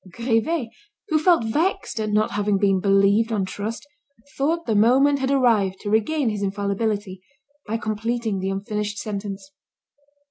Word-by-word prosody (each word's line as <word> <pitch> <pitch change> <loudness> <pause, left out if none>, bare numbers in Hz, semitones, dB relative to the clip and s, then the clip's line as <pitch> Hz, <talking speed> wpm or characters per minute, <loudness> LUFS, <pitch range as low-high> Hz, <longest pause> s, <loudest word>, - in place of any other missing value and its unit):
Grivet 235 - 0 0.4
who 310 -1 +2
felt 335 -4 +4
vexed 315 - -1
at 215 -1 -1
not 210 +1 +1
having 205 -1 0
been 195 -1 +2
believed 200 +3 +3
on 205 -4 0
trust, 210 +7 -5 0.5
thought 325 +5 0
the 225 - 0
moment 265 +7 +4
had 265 0 -1
arrived 225 -8 +2
to 205 - -4
regain 245 +5 +1
his 205 -1 -4
infallibility, 200 -1 -2 0.5
by 220 +2 -1
completing 225 -1 -2
the 190 +1 -2
unfinished 210 +2 -3
sentence. 205 +5 -6
215 Hz, 145 wpm, -23 LUFS, 200-245 Hz, 0.5 s, felt